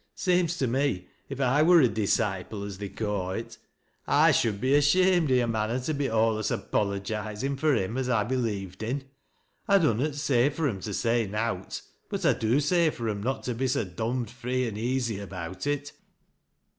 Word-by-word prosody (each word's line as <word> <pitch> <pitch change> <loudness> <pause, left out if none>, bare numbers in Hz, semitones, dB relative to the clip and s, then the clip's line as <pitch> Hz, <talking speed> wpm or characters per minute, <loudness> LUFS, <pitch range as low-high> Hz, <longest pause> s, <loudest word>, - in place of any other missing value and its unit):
Seems 180 -2 +1
to 135 - +1
me 125 -7 -1 0.2
if 135 - -5
1 140 +4 +3
wur 175 -1 +7
a 130 - +5
disciple 100 -2 -1
as 100 -2 -7
they 100 -1 -5
ca' 100 -2 -3
it 115 +2 -6 0.5
I - - +5
shoul 110 - +2
t - - -8
be 130 +6 +1
ashamed 170 +2 +4
i' - - +5
a 125 -1 +3
manner 110 +2 -1
to 155 +5 -2
be 140 -1 -1
alius 110 -1 +1
apologizin' 105 +5 -2
fur 150 -1 +3
him 95 +5 -1
as 130 -1 -2
I 115 -4 +2
believed 105 -6 -3
in. 130 +5 -2 0.6
I 200 - +6
dunnot 150 - +1
say 140 -3 +2
for 150 +1 -1
'era 100 -7 -3
to 105 - -5
say 115 -2 +1
nowt, 110 +3 -3 0.3
biit - - -1
I - - +5
do 115 +5 +1
say 165 +3 +3
for 120 -6 -4
'em 100 -1 -3
not 130 +5 -2
to 125 - -2
be 130 +3 -1
so 130 -1 +1
dom'd 115 +5 -3
free 125 +1 -2
an 110 - -5
easy 120 0 -1
ab'^ut 95 +1 -6
it. 145 0 -2
120 Hz, 195 wpm, -27 LUFS, 105-140 Hz, 0.6 s, wur